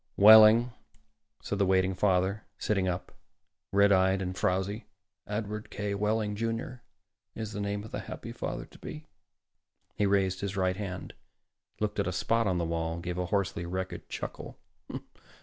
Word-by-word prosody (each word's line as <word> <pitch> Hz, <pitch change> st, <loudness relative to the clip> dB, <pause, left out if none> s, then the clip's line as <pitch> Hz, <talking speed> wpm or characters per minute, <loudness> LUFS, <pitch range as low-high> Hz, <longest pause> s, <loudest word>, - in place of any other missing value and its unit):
"Wehling," 110 Hz, +3 st, +8 dB, 0.7 s
said 100 Hz, -, -3 dB
the 100 Hz, -, +4 dB
waiting 95 Hz, 0 st, +3 dB
father, 95 Hz, +2 st, +1 dB
sitting 100 Hz, -3 st, 0 dB
up, 90 Hz, 0 st, -3 dB, 0.6 s
red 100 Hz, +1 st, +5 dB
eyed 95 Hz, 0 st, +4 dB
and 90 Hz, -1 st, -3 dB
frowzy. 95 Hz, +4 st, -1 dB, 0.4 s
"Edward 105 Hz, 0 st, -4 dB
K. 105 Hz, 0 st, -3 dB
Wehling, 105 Hz, +1 st, 0 dB
Jr., 115 Hz, +3 st, -3 dB, 0.5 s
is 110 Hz, -1 st, -5 dB
the 105 Hz, -, -4 dB
name 100 Hz, 0 st, -2 dB
of 110 Hz, -, -10 dB
the -, -, -3 dB
happy -, -, -7 dB
father -, -, -4 dB
to -, -, -18 dB
be." 155 Hz, 0 st, -8 dB, 0.9 s
He 105 Hz, -, +1 dB
raised 95 Hz, -2 st, +1 dB
his 100 Hz, -1 st, -3 dB
right 95 Hz, -1 st, +1 dB
hand, 95 Hz, -2 st, -6 dB, 0.7 s
looked 105 Hz, -1 st, -1 dB
at 100 Hz, -, +1 dB
a -, -, 0 dB
spot 115 Hz, +5 st, +1 dB
on 90 Hz, -2 st, +1 dB
the 85 Hz, -, 0 dB
wall, 80 Hz, 0 st, -2 dB
gave 90 Hz, +1 st, -4 dB
a 90 Hz, -, -1 dB
hoarsely 95 Hz, -2 st, -1 dB
wretched 95 Hz, +1 st, -4 dB
chuckle. -, -, -6 dB
100 Hz, 160 wpm, -29 LUFS, 95-105 Hz, 0.9 s, Wehling